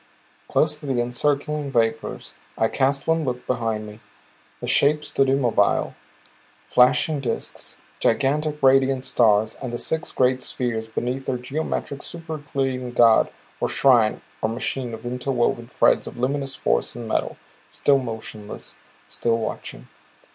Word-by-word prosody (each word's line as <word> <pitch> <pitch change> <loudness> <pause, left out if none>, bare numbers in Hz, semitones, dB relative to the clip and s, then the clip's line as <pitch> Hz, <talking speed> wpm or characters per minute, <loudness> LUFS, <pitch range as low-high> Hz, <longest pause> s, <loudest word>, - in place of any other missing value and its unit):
Close 150 0 +1
to 150 - -9
the 130 -3 0
encircling 140 +4 0
vapors 115 -2 -1 0.2
I 110 - +2
cast 135 0 +1
one 160 0 +2
look 125 -3 -3
behind 115 -3 -1
me. 105 +1 -11 0.6
The - - -5
shapes 150 +1 +2
stood 135 -1 +2
immobile, 120 -7 +2 0.7
flashing 135 +4 +3
disks, 125 -4 -3 0.2
gigantic 150 +4 +1
radiant 135 0 +4
stars 110 -4 +3
and 130 -3 -4
the 120 - -3
six 160 +6 -2
great 130 0 +2
spheres 115 -3 -2
beneath 125 +4 -3
their 130 - 0
geometric 140 +2 -3
super 160 -2 -6
Euclidean 135 -4 -3
god 115 -2 +5 0.3
or - - 0
shrine 120 -5 +4 0.2
or 110 - +1
machine 120 +1 -3
of 110 - -13
interwoven 125 -1 -1
threads - - +2
of - - -8
luminous 135 +2 -1
force - - 0
and 120 -1 -6
metal - - -1 0.3
still 140 -1 +3
motionless, 110 -3 -7 0.3
still 115 -1 0
watching. 110 - -5
125 Hz, 140 wpm, -23 LUFS, 115-140 Hz, 0.7 s, god